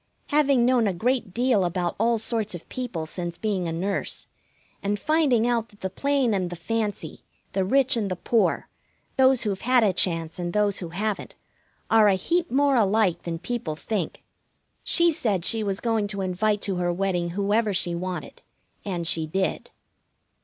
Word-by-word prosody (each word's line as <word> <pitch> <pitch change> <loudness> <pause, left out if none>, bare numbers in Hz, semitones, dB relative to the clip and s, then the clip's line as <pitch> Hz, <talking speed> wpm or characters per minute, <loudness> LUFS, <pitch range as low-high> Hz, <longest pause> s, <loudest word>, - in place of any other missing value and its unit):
Having 280 -4 +3
known 245 -3 +3
a 190 - -1
great 240 +1 0
deal 235 -1 +2
about 175 0 -1
all 230 +1 +3
sorts 220 -3 -1
of 170 - -10
people 240 -11 -4
since 175 +1 -4
being 195 -5 -1
a - - -2
nurse, 190 +4 -2 0.6
and 205 +1 -1
finding 295 -7 +2
out 235 -2 0
that 205 - -21
the 190 - -3
plain 275 0 +1
and 185 -3 0
the 175 - -6
fancy, 210 +4 -3 0.3
the 190 - +1
rich 265 +6 +3
and 215 -4 -1
the 185 - -2
poor, 225 +5 +1 0.5
those 265 -1 +4
who've 200 -3 -2
had 250 0 +4
a 200 -3 +3
chance 165 -1 +1
and 175 -1 -3
those 205 -2 +1
who 175 - -6
haven't, 205 +4 -3 0.6
are 220 -1 +6
a 200 - +4
heap 340 - 0
more 280 +2 +3
alike 205 -5 +2
than 170 -1 -4
people 180 -3 -4
think, 190 +1 -4 0.6
she 340 -1 +4
said 205 - -1
she 225 -1 +1
was 195 -2 -1
going 225 -3 0
to 200 -1 -3
invite 200 +3 0
to 195 -3 -1
her 175 0 0
wedding 175 -1 -1
whoever 210 +2 +2
she 175 -2 0
wanted. 180 +1 -5 0.4
And 175 -4 -3
she 160 -1 0
did. 190 +4 -2
205 Hz, 180 wpm, -25 LUFS, 180-235 Hz, 0.6 s, are